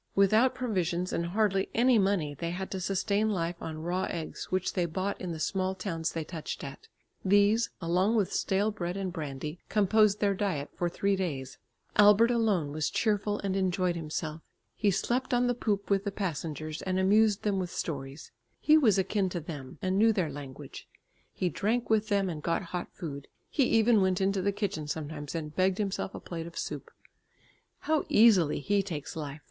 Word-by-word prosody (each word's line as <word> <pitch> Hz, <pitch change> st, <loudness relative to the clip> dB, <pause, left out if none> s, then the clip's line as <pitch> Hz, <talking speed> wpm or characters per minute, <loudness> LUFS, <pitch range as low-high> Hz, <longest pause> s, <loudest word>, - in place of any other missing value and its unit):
Without 215 Hz, +6 st, +4 dB
provisions 185 Hz, -8 st, -1 dB
and 170 Hz, -, -1 dB
hardly 195 Hz, 0 st, +1 dB
any 245 Hz, 0 st, +5 dB
money 190 Hz, -7 st, +1 dB
they 170 Hz, +4 st, -4 dB
had 190 Hz, +3 st, -5 dB
to 190 Hz, -, -3 dB
sustain 200 Hz, +3 st, 0 dB
life 170 Hz, -3 st, -2 dB
on 155 Hz, -1 st, -5 dB
raw 180 Hz, +2 st, -1 dB
eggs 165 Hz, -2 st, -5 dB
which 185 Hz, 0 st, -1 dB
they 175 Hz, -2 st, 0 dB
bought 190 Hz, +4 st, -3 dB
in 180 Hz, -, -3 dB
the 160 Hz, -, -5 dB
small 190 Hz, +3 st, -1 dB
towns 170 Hz, -4 st, -3 dB
they 165 Hz, -, -3 dB
touched 160 Hz, 0 st, -6 dB
at. 140 Hz, -1 st, -9 dB, 0.4 s
These 205 Hz, +4 st, +4 dB
along 185 Hz, +5 st, +1 dB
with 205 Hz, -4 st, +1 dB
stale 200 Hz, +3 st, +1 dB
bread 180 Hz, -3 st, -4 dB
and 190 Hz, -2 st, -3 dB
brandy, 150 Hz, 0 st, -5 dB
composed 210 Hz, 0 st, +3 dB
their 200 Hz, -1 st, +2 dB
diet 185 Hz, -8 st, -2 dB
for 175 Hz, -, -1 dB
three 200 Hz, +3 st, 0 dB
days. 140 Hz, -8 st, -4 dB, 0.4 s
Albert 210 Hz, +3 st, +7 dB
alone 210 Hz, -11 st, +1 dB
was 155 Hz, 0 st, -1 dB
cheerful 210 Hz, -1 st, 0 dB
and 195 Hz, -1 st, -1 dB
enjoyed 185 Hz, -2 st, +1 dB
himself. 155 Hz, 0 st, -4 dB, 0.3 s
He 210 Hz, -, +2 dB
slept 245 Hz, +7 st, 0 dB
on 245 Hz, +1 st, +3 dB
the 245 Hz, -, +2 dB
poop 205 Hz, -4 st, -2 dB
with 195 Hz, 0 st, +3 dB
the 200 Hz, -, -2 dB
passengers 155 Hz, -5 st, -4 dB
and 185 Hz, -1 st, -1 dB
amused 205 Hz, +2 st, +3 dB
them 200 Hz, -2 st, +1 dB
with 180 Hz, -2 st, -2 dB
stories; 140 Hz, -4 st, -5 dB, 0.3 s
he 310 Hz, +1 st, +5 dB
was 220 Hz, -10 st, +4 dB
akin 195 Hz, 0 st, +1 dB
to 175 Hz, -, -3 dB
them, 145 Hz, -5 st, -8 dB
and 185 Hz, +1 st, +1 dB
knew 225 Hz, +1 st, +6 dB
their 185 Hz, -8 st, 0 dB
language. 140 Hz, -2 st, -9 dB, 0.4 s
He 185 Hz, -, -1 dB
drank 220 Hz, +6 st, -1 dB
with 215 Hz, -1 st, +3 dB
them 200 Hz, -2 st, +1 dB
and 160 Hz, -4 st, -4 dB
got 165 Hz, +4 st, 0 dB
hot 180 Hz, -, -3 dB
food; 140 Hz, -6 st, -7 dB, 0.2 s
he 275 Hz, -, +3 dB
even 225 Hz, -2 st, +4 dB
went 185 Hz, -1 st, +2 dB
into 195 Hz, 0 st, +1 dB
the 200 Hz, +2 st, +1 dB
kitchen 195 Hz, -7 st, -3 dB
sometimes 150 Hz, 0 st, -5 dB
and 150 Hz, -2 st, -5 dB
begged 185 Hz, 0 st, +2 dB
himself 195 Hz, -2 st, -2 dB
a -, -, -5 dB
plate 165 Hz, -1 st, -6 dB
of 170 Hz, -, -11 dB
soup. -, -, -5 dB, 0.9 s
"How 315 Hz, -1 st, +1 dB
easily 190 Hz, -10 st, +5 dB
he 205 Hz, +5 st, +2 dB
takes 165 Hz, -7 st, -6 dB
life!" 150 Hz, -2 st, -5 dB
190 Hz, 190 wpm, -29 LUFS, 165-205 Hz, 0.9 s, Albert